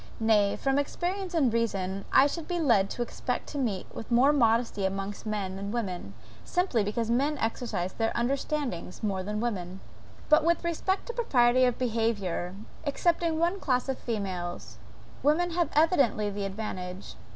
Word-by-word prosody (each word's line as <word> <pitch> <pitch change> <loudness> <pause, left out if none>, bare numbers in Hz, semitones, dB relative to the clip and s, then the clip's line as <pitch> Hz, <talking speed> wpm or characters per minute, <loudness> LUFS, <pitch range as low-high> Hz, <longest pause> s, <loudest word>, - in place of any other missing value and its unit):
Nay, 215 -3 +3
from 270 0 +1
experience, 360 +5 -2
and 270 -8 +3
reason, 195 -4 -1
I 270 - +7
should 310 +3 -3
be 355 -1 -1
lead 225 -11 +3
to 240 - -2
expect 245 +1 -3
to 290 - -4
meet 210 -8 -1
with 225 - -8
more 260 +5 +5
modesty 230 -5 +2
amongst 195 +2 -3
men 200 -3 -2
than 200 +1 -5
women, 185 - -4 0.3
simply 355 - +1
because 225 +3 -1
men 285 +5 +1
exercise 225 -6 -2
their 225 -1 0
understandings 255 - -2
more 195 -3 0
than 210 +3 -3
women. 190 -5 -3 0.5
But, 305 0 +5
with 340 +2 +2
respect 340 +3 -1
to 475 - -5
propriety 255 - +4
of 245 -2 +1
behaviour, 215 -7 -1 0.3
excepting 330 +2 +1
one 345 +4 +1
class 255 -5 0
of 265 -1 -2
females, 185 -6 -4 0.4
women 345 +5 +2
have 345 0 +1
evidently 275 - +3
the 200 0 -3
advantage. 190 -2 -5
235 Hz, 160 wpm, -28 LUFS, 200-290 Hz, 0.5 s, I